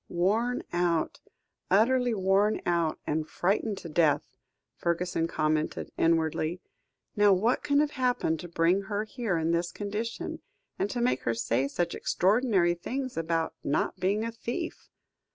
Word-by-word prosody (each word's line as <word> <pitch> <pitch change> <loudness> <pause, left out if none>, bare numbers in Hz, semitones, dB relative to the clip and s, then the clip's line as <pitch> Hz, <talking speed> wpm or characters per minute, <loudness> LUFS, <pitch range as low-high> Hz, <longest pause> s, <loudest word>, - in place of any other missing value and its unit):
"Worn 220 +8 +1
out, 175 -2 0 0.5
utterly 240 +4 +3
worn 195 +2 +2
out, 170 -2 +1
and 155 +1 -1
frightened 200 +3 0
to 170 - -8
death," 155 -2 +1 0.4
Fergusson 170 -1 -1
commented 155 -1 -1
inwardly; 165 +1 +1 0.6
"now 205 -1 +5
what 220 +7 +2
can 285 0 +2
have 300 -1 0
happened 250 - 0
to 175 - -7
bring 170 +3 +2
her 205 +1 -2
here 220 -4 -2
in 165 +1 0
this 170 +1 0
condition, 210 +3 -4 0.4
and 200 - 0
to 240 - -2
make 245 - +1
her 115 - 0
say 115 +3 0
such 175 +4 -2
extraordinary 195 -3 +2
things 255 +9 -4
about 165 0 -1
not 140 - -1
being 200 +4 +1
a 230 - -2
thief. 240 +9 -5
185 Hz, 145 wpm, -28 LUFS, 165-225 Hz, 0.6 s, now